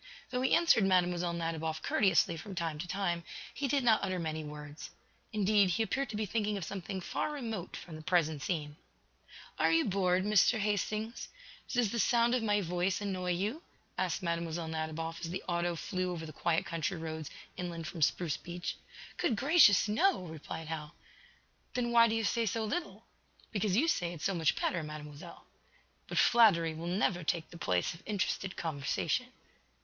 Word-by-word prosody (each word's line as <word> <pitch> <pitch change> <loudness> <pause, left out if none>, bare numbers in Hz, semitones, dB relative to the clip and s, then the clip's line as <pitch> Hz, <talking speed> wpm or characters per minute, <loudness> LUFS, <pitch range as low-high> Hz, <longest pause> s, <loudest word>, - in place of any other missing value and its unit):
Though 250 0 0
he 260 - +4
answered 335 -11 +5
Mlle. 185 -2 +5 0.3
Nadiboff 160 -2 -3
courteously 185 -4 +3
from 185 +4 -8
time 165 -3 -2
to 175 - -4
time, 175 -3 -1 0.3
he 280 - -2
did 275 0 +1
not 225 -3 +5
utter 185 -1 -1
many 160 -2 -3
words. 150 0 -8 0.4
Indeed, 205 -2 +3
he 215 +6 +1
appeared 270 +3 -1
to 215 - -5
be 215 0 -1
thinking 210 0 -1
of 195 - -4
something 190 +1 -5
far 240 - -2
remote 225 - -5
from 165 - -9
the - - -9
present 160 -3 +1
scene. 150 -1 -3 0.8
"Are 160 +1 +4
you 165 0 +4
bored, 185 -2 +2
Mr. 210 +3 +4
Hastings? 215 +2 -2 0.4
Does 240 -5 +1
the 235 - -1
sound 235 +3 +3
of 250 - +2
my 205 -2 +2
voice 180 +1 0
annoy 185 -3 -1
you?" 210 - -2 0.3
asked - - -1
Mlle. 170 -1 0 0.3
Nadiboff, 160 +1 -3
as 170 - -5
the 185 +2 -4
auto 175 -1 0
flew 185 +2 -2
over 165 -2 -5
the 155 - -9
quiet 170 -1 0
country 165 +2 -2
roads 160 -1 -5 0.3
inland 170 -2 -5
from 160 +3 -6
Spruce 155 0 +1
Beach. 175 0 -5 0.4
"Good 230 - +1
gracious, 270 - +6
no!" 280 - +2
replied 160 0 -7
Hal. 150 -2 -5 0.8
"Then 240 -1 0
why 230 -1 +7
do 225 - 0
you 225 - 0
say 230 +2 +1
so 220 +2 -1
little?" 340 +10 -4 0.5
"Because 205 -2 +1
you 305 +7 +4
say 175 - 0
it 165 - -9
so 195 - +1
much 165 -3 +2
better, 175 - 0
Mademoiselle." 150 -1 -9 0.6
"But - - -4
flattery 200 -9 +5
will 165 +2 -6
never 180 -1 +1
take 160 +1 -1
the 170 - -9
place 90 - 0
of 165 - -13
interested 195 -2 -1
conversation." 160 - -1
180 Hz, 180 wpm, -32 LUFS, 165-215 Hz, 0.8 s, why